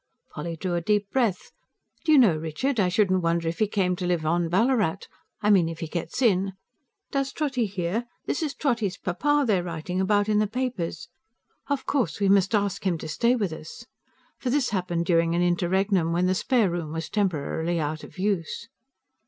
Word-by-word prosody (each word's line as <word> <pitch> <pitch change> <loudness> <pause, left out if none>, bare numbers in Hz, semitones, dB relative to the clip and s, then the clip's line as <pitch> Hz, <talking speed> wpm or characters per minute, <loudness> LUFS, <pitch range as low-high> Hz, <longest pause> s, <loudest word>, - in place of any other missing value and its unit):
Polly 165 +2 -5
drew 180 +2 -3
a 170 - 0
deep 205 +2 0
breath. 230 -9 0 0.5
"Do 315 - +3
you 305 - +7
know, 220 - +6
Richard, 165 - -2
I 185 -3 +3
shouldn't 185 -1 +2
wonder 165 0 0
if 165 - -3
he 215 - +3
came 190 -3 0
to 180 - -2
live 175 -3 0
on 170 +1 +1
Ballarat 200 -2 +1 0.4
I 210 - +4
mean 180 -5 +4
if 165 - -6
he 165 - -4
gets 170 +10 -3
in. 195 -4 +2 0.6
Does 275 -1 -1
Trotty 270 -7 -1
hear? 195 +4 -2 0.2
This - - -1
is 300 -3 -2
Trotty's 230 - 0
papa 290 +11 +1
they're 200 -6 +2
writing 175 +2 -3
about 205 +1 +2
in 210 -1 +2
the 215 - +2
papers. 235 -9 -3 0.6
Of 285 -2 -1
course 270 -7 0
we 200 -1 +2
must 195 +2 +4
ask 200 -2 0
him 185 -3 +1
to 155 - -7
stay 235 +11 +2
with 200 -9 -1
us." 160 +9 -10 0.5
For 255 - -2
this 260 -1 +1
happened 175 -4 -1
during 165 -1 +2
an 175 - +2
interregnum, 175 0 +1
when 175 +2 +2
the 185 - +2
spare 220 0 +2
room 165 -3 -4
was 165 -1 -3
temporarily 170 -4 -1
out 155 0 -3
of - - -12
use. 185 -4 -2
185 Hz, 195 wpm, -26 LUFS, 170-215 Hz, 0.6 s, you